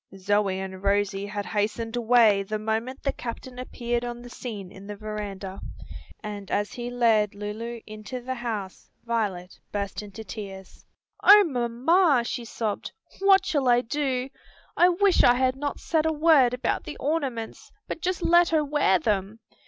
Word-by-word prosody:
Zoe 200 0 +1
and 190 -1 -6
Rosie 200 0 0
had 205 0 -4
hastened 220 +2 -2
away 230 -4 +4
the 210 +2 -3
moment 225 +5 -3
the 275 - 0
captain 250 +1 -7
appeared 240 -1 -3
upon 240 0 -5
the 245 - -11
scene 205 -8 -7
in 195 0 -12
the 210 - -6
veranda, 205 -2 -6 0.6
and 205 -2 -6
as 205 0 -1
he 240 0 -5
led 225 -4 +2
Lulu 220 +3 -5
into 215 +4 -7
the 255 +1 -4
house 225 -6 -5 0.2
Violet 205 -6 -2
burst 200 -1 -3
into 210 +1 -9
tears. 195 -2 -9 0.4
"O 410 +1 +9
mamma!" 270 +2 +2
she 240 0 -4
sobbed, 220 -2 -3 0.3
"what 390 0 +5
shall 280 -5 0
I 240 0 +5
do? 260 0 -1 0.5
I 355 - +6
wish 380 +1 +3
I 245 - +6
had 255 0 +1
not 285 +1 -4
said 320 -1 +1
a - - +2
word 295 -5 +4
about 250 - -1
the - - -7
ornaments, 275 -7 -3 0.2
but - - -5
just 360 0 -1
let 345 0 +5
her 310 -2 +2
wear 285 -10 +3
them! 200 +4 -1
235 Hz, 165 wpm, -26 LUFS, 205-260 Hz, 0.6 s, O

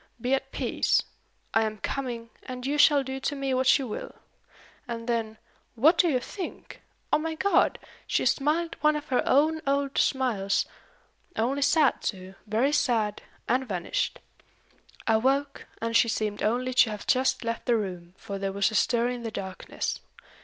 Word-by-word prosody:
'Be 250 +3 0
at 270 - -1
peace. - - +1 0.5
I 225 - +4
am 215 -1 -1
coming; 235 -1 -4
and 250 -1 -7
you 290 +2 0
shall 285 -2 +6
do 265 0 -5
to 290 - -2
me 275 -1 -1
what 255 0 +4
you 270 - -4
will.' 210 - -6 0.7
And 230 -1 -5
then 225 -2 -1 0.4
what 300 +9 +5
do 350 - +5
you 260 -4 +2
think? 365 +8 -8 0.3
O - - +5
my 320 +1 -3
God! 400 +5 +2 0.3
she - - +1
smiled 315 +4 +1
one 305 0 +4
of 300 0 -5
her 255 - +2
own 310 +4 +3
old 280 0 +1
smiles, 230 -8 +1 0.7
only 260 +5 0
sad 300 0 +3
too, 190 -1 -4
very 230 +7 +2
sad, 225 -8 +1 0.3
and 255 +2 +1
vanished. 180 -3 -1 0.9
I 225 -1 +4
woke, 275 +4 0
and 230 0 -2
she 230 - +5
seemed 215 -2 -2
only 250 +4 0
to 250 -2 +5
have 210 -1 -6
just 260 0 +2
left 230 0 -3
the 240 -2 +4
room, 180 -4 -5
for 200 -1 -6
there 195 0 -2
was 200 +2 +1
a - - -8
stir 235 +2 +2
in 250 -1 -4
the 230 - -4
darkness. 190 -3 -4
250 Hz, 175 wpm, -27 LUFS, 220-275 Hz, 0.9 s, shall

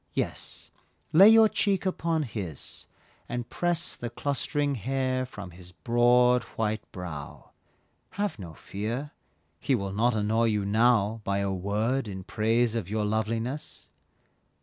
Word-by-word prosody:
Yes, - - -4 0.4
lay 195 +7 +9
your 225 0 +8
cheek 200 -3 0
upon 165 -4 0
his, 100 - -7 0.4
and 120 0 -3
press 175 -1 -1
The 120 - -5
clustering 145 +3 -1
hair 130 +1 -1
from 100 -6 -9
his 90 +1 -12
broad 125 +2 +4 0.2
white 110 -1 -2
brow, 80 -6 -8 0.7
Have 205 - -1
no 85 -4 -8
fear, 115 - -4 0.5
he 135 - +1
will 100 -4 -3
not 115 +3 +2
annoy 110 +2 +2
you 105 -3 +1
now 110 0 +3
By 100 0 0
a 100 -1 0
word 105 +7 -1
in 95 -2 -6
praise 115 +3 +1
of 110 -6 -3
your 105 0 0
loveliness. 115 +6 -2
115 Hz, 135 wpm, -28 LUFS, 100-135 Hz, 0.7 s, lay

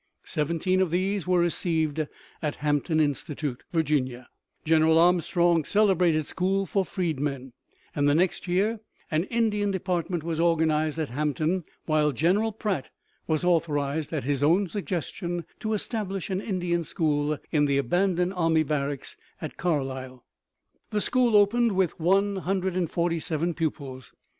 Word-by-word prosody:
Seventeen 170 +5 0
of 185 - +2
these 185 +2 -1
were 180 0 +3
received 160 -3 0 0.3
at 150 -3 -2
Hampton 150 +2 0
Institute, 145 -2 -2
Virginia, 135 -6 0 0.4
General 160 0 +4
Armstrong's 170 -1 +3
celebrated 180 -7 +3
school 195 +4 0
for 195 +2 0
freedmen, 145 -8 -3 0.4
and 145 0 +2
the 145 - +3
next 180 +3 +1
year 205 +6 +1 0.3
an 160 +3 +1
Indian 210 -2 0
department 180 -3 -2
was 165 -1 -3
organized 160 -2 +2
at 155 -3 -2
Hampton, 150 +5 -1 0.2
while 155 -1 +2
General 190 - +2
Pratt 205 -9 -3 0.4
was 155 0 0
authorized, 155 -4 0
at 155 -4 -2
his 140 +1 -1
own 170 +7 +4
suggestion, 175 -2 -4
to 220 -1 -2
establish 200 -3 -3
an 190 +1 -1
Indian 175 -4 -1
school 150 -2 0
in 150 -2 +3
the 140 -1 +2
abandoned 180 +6 +1
army 165 -3 +2
barracks 140 -2 -3 0.2
at - - -6
Carlisle. 130 -6 -3 0.6
The 210 - 0
school 245 -2 +2
opened 220 +2 +4
with 185 -3 0
147 175 -3 0
pupils. 140 -5 -4
170 Hz, 130 wpm, -26 LUFS, 150-185 Hz, 0.6 s, General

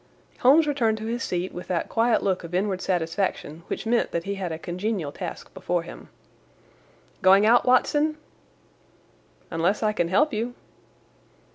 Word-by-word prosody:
Holmes 290 +6 +6
returned 240 -7 +1
to 220 - -6
his 235 +1 -3
seat 180 +1 -3
with 180 - -8
that 175 -3 -1
quiet 230 0 +2
look 190 -2 0
of 170 +1 -6
inward 190 0 0
satisfaction 170 -2 -2
which - - -4
meant 235 +1 +1
that 170 - -3
he 200 +2 -3
had 190 -3 -4
a 160 - -4
congenial 180 -1 -3
task - - -7
before 175 -1 -2
him. 170 - -11 1.1
"Going 195 +2 +6
out, 235 +2 +5
Watson?" 295 +4 +3 1.3
"Unless 175 +6 0
I 215 0 +2
can 175 -5 0
help 280 - +2
you." 235 +3 -3
195 Hz, 155 wpm, -25 LUFS, 175-230 Hz, 1.3 s, Holmes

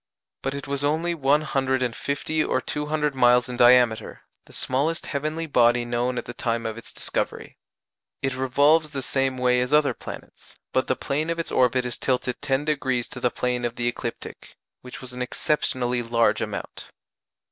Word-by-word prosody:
But 135 +1 -2
it 140 - -6
was 140 0 -2
only 160 +4 +1
one 145 -1 +2
hundred 130 -3 0
and 120 -2 -2
fifty 155 +2 -1
or - - 0
two 150 +3 -4
hundred 150 -1 0
miles 125 -1 +4
in 125 - -5
diameter 120 -2 +4 0.2
the - - -18
smallest 145 +6 -1
heavenly 155 +3 -3
body 120 -4 +3
known 120 +1 -1
at 120 - -3
the 120 - -7
time 115 -1 -2
of 110 -1 -3
its 115 - -9
discovery. - - -4 0.6
It 135 -1 -1
revolves 145 +5 +3
the 140 -2 -5
same 135 0 0
way 125 0 +3
as 125 - -2
other 150 -1 +4
planets, - - -11 0.2
but 130 - +1
the 130 - +1
plane 150 +5 -2
of 170 - -1
its 165 - -3
orbit 125 0 +2
is 125 - -4
tilted 125 -1 -1
10° 135 -3 0
to 125 - -8
the 125 - +2
plane 125 0 -1
of 120 -1 -2
the 120 -1 -1
ecliptic, 120 -1 -6 0.3
which 125 - -10
was 125 -1 -8
an 125 - -6
exceptionally 125 -2 0
large 115 0 +2
amount. - - -5
130 Hz, 185 wpm, -24 LUFS, 125-145 Hz, 0.6 s, miles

